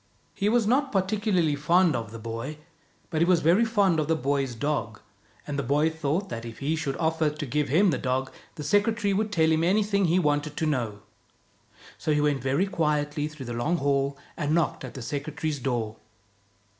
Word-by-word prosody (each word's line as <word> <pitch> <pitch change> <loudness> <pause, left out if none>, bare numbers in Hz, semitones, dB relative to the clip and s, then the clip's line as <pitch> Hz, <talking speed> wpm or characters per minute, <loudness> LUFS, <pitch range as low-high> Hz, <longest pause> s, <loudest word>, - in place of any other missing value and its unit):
He 200 - 0
was 235 0 +3
not 265 +5 +2
particularly 190 -4 +1
fond 165 +2 +3
of 115 -3 -4
the 115 - -7
boy, 115 +6 -5 0.5
but 160 -1 0
he - - +5
was 175 -2 +3
very 175 +8 +4
fond 200 -7 +2
of 150 - 0
the 160 - +2
boy's 140 -4 -1
dog; 115 -4 -2 0.5
and 145 -1 -3
the - - +2
boy 145 +5 +2
thought 160 +5 -1
that 115 -7 -5
if 115 -1 -8
he 150 +3 -1
should 145 -4 -3
offer 160 -1 +1
to 150 0 -5
give 145 +2 -1
him 180 +7 +4
the 135 - -1
dog, 130 0 -1 0.2
the 150 - -6
secretary 205 +5 +2
would 210 +2 0
tell 160 -4 +3
him 160 +1 +2
anything 200 +2 +2
he 170 +1 +3
wanted 150 -3 0
to 160 - 0
know. 120 -9 -1 1.0
So 155 - 0
he - - +2
went 145 -2 +1
very 135 +8 +1
quietly 150 -4 0
through 155 -3 -9
the 120 - -5
long 120 +9 0
hall, 140 -1 0 0.2
and 150 -1 0
knocked 170 -2 0
at - - -8
the 130 - -6
secretary's 150 +3 -3
door. 120 -4 -2
150 Hz, 200 wpm, -26 LUFS, 140-175 Hz, 1.0 s, he